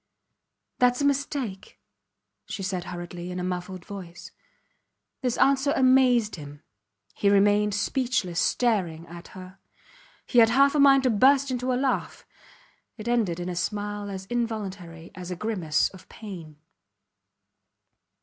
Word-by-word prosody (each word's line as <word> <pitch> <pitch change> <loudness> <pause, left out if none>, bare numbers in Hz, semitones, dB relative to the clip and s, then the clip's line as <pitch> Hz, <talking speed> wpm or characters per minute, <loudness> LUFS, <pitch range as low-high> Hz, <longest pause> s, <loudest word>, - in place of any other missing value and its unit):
Thats 250 +1 +3
a - - +1
mistake, 275 -7 -2 0.7
she 195 - -5
said 185 -2 -3
hurriedly, 175 0 -7
in 180 0 -5
a - - -3
muffled 180 0 -5
voice. 180 -4 -9 0.9
This 250 -2 -1
answer 275 +1 +3
amazed 255 -5 +3
him. 145 0 -11 0.5
He 200 - +1
remained 205 +1 +3
speechless, 205 -6 -1
staring 185 -9 0
at 170 +1 -11
her. 185 +1 -11 0.7
He 245 - +3
had 225 -1 +7
half 275 +4 +4
a 300 - +1
mind 275 -1 +6
to 255 - +3
burst 270 +5 +4
into 250 0 -1
a - - +1
laugh. 265 0 -2 0.7
It 215 0 -8
ended 220 -8 0
in 175 - -4
a 180 - -4
smile 205 +2 -3
as 190 -1 -6
involuntary 195 -8 -4
as 180 0 -8
a 180 - -3
grimace 175 -6 0
of 190 -1 -16
pain. 175 -9 -10
205 Hz, 140 wpm, -26 LUFS, 180-250 Hz, 0.9 s, had